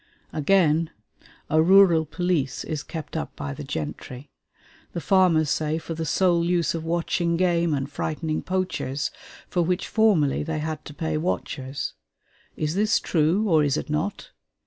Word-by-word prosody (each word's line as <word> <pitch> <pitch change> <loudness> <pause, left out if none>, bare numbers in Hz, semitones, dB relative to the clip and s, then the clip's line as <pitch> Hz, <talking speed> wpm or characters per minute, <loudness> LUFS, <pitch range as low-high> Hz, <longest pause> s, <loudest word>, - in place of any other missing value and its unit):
Again, 160 0 +3 0.6
a 155 +1 +3
rural 175 -3 +6
police 170 -6 -1
is 155 -3 -3
kept 160 -1 -7
up - - -4
by 70 -1 -5
the - - -7
gentry; 125 - -6 0.6
the - - -2
farmers 170 -5 +3
say 155 0 0
for 165 0 -5
the 160 0 -4
sole 175 -1 +3
use 175 -1 +1
of 165 -1 -4
watching 170 0 0
game 170 -2 +2
and 135 0 -2
frightening 155 +2 -3
poachers, 185 -7 -2 0.4
for 180 - 0
which 180 +2 0
formerly 200 -11 +3
they 160 +1 -3
had 155 0 -4
to 145 - -10
pay 160 -2 -2
watchers. 140 -4 -3 0.6
Is 155 0 -1
this 215 +4 +2
true, 170 +6 +1
or 160 -5 +4
is 145 0 +1
it - - -4
not? 155 +7 -3
160 Hz, 155 wpm, -25 LUFS, 150-180 Hz, 0.6 s, rural